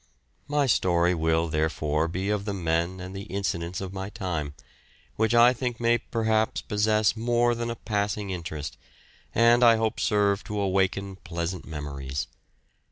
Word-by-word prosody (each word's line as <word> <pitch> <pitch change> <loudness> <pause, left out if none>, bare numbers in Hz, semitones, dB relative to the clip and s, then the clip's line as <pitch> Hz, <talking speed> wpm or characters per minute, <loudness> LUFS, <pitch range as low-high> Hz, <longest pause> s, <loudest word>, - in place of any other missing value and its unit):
My 145 -1 +2
story 90 -7 +3
will 80 0 +1
therefore 75 0 0
be 95 +4 -2
of 105 -1 -1
the 100 -2 -2
men 85 +1 -1
and 95 +1 -7
the 100 +1 -6
incidents 90 -3 -2
of 95 -1 -5
my 95 0 -5
time, 80 -8 -4 0.6
which 110 +2 +2
I 120 +1 +7
think 125 -2 -3
may 120 0 +3
perhaps 110 +1 0
possess 105 0 +2
more 120 +1 +2
than 120 0 -3
a 115 - -3
passing 105 -2 -2
interest, 80 -5 -5 0.6
and 120 +1 +5
I 115 -1 +7
hope 110 0 -1
serve 100 -1 +2
to 105 0 -3
awaken 95 0 0
pleasant 85 0 -4
memories. 70 -3 -4
100 Hz, 155 wpm, -26 LUFS, 85-110 Hz, 0.6 s, I